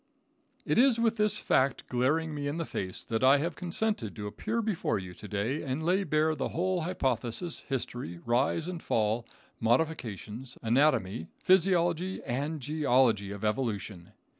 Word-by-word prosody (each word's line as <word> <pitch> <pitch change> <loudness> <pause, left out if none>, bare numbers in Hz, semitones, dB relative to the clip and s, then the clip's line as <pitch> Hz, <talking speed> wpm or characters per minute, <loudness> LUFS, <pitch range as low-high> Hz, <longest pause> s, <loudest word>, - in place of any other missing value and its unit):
It - - +2
is 250 -2 +5
with 230 0 +2
this 210 -1 +2
fact 135 -7 +1
glaring 150 +6 +1
me 145 -1 -3
in 145 +3 -2
the 165 - -2
face 95 -8 -4
that 115 +2 -2
I 135 +2 +7
have 165 +5 -2
consented 180 - -2
to 105 - -6
appear 220 - -2
before 210 - 0
you 95 -2 -7
to 100 +4 -10
day 110 +9 -1
and 140 +2 -3
lay 185 +3 +2
bare 155 -1 +2
the 145 - -2
whole 180 +1 0
hypothesis, 135 -1 0
history, 120 -8 -3
rise 130 +7 +1
and 180 -2 -5
fall, 110 +1 0 0.3
modifications, 120 -2 -1
anatomy, 115 - +2
physiology 180 -1 +2
and 145 +6 -2
geology 130 -8 +2
of 100 +1 -5
evolution. 105 -6 -2
140 Hz, 155 wpm, -29 LUFS, 115-170 Hz, 0.3 s, I